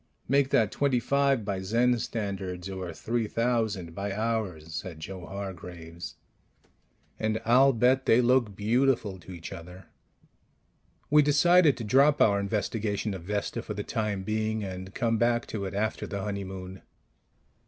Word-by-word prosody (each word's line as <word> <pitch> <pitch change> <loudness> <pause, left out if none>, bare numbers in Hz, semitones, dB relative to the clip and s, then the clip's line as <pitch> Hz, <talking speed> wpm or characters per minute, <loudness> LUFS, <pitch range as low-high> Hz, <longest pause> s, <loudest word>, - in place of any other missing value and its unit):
"Make 140 +1 +3
that 110 -6 +3
twenty 140 -3 +1
five 140 -2 +1
by 95 -2 -2
Zen 120 +5 +2
standards 95 -5 -4
or 95 -2 -5
three 115 +6 -2
thousand 110 -7 -1
by 100 +3 -3
ours," 100 -7 -2
said 85 -2 -6
Joe 90 +3 -7
Hargraves, 90 -3 -7 1.0
"and 110 0 0
I'll 130 +4 +6
bet 130 +2 +2
they 115 - +6
look 120 -4 +3
beautiful 110 -2 +1
to 90 - -12
each 85 -2 -8
other." 90 +3 -10 1.3
We 150 0 +7
decided 150 +2 +5
to 115 - -5
drop 140 +7 +4
our 100 -2 +4
investigation 105 +1 -2
of 95 - -6
Vesta 105 +3 -2
for 105 -2 -6
the 105 - -3
time 105 -4 -2
being, 110 +1 -1
and 95 0 -6
come 115 -3 +1
back 120 0 +2
to 100 -3 -3
it 95 - -5
after 110 +2 -1
the 100 -1 -4
honeymoon. 95 -2 -5
105 Hz, 150 wpm, -28 LUFS, 95-120 Hz, 1.3 s, We